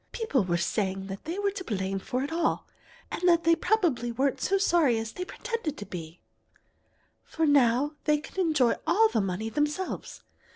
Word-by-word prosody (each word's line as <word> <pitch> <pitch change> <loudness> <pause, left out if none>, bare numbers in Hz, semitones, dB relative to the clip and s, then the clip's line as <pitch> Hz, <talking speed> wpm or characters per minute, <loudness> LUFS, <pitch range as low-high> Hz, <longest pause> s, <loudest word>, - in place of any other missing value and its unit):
People 290 - +1
were 175 -2 0
saying 190 +2 -1
that 195 0 -8
they 335 +4 -4
were 405 0 +1
to 390 -1 -6
blame 195 - -2
for 250 +6 -2
it 285 - -4
all, 330 0 0 0.4
and - - -4
that 340 -1 +4
they 335 0 +5
probably 330 - +1
weren't 265 +3 0
so 395 - +2
sorry 335 - +3
as 225 0 -4
they 360 - -5
pretended 455 - -4
to 205 - -7
be, 165 -3 -8 1.0
for 320 - -1
now 280 0 +3
they 300 -1 +4
could 315 +5 -8
enjoy 305 -9 +3
all 445 +3 +5
the 220 - +1
money 195 +3 -2
themselves. 295 +9 -3
290 Hz, 180 wpm, -28 LUFS, 220-345 Hz, 1.0 s, they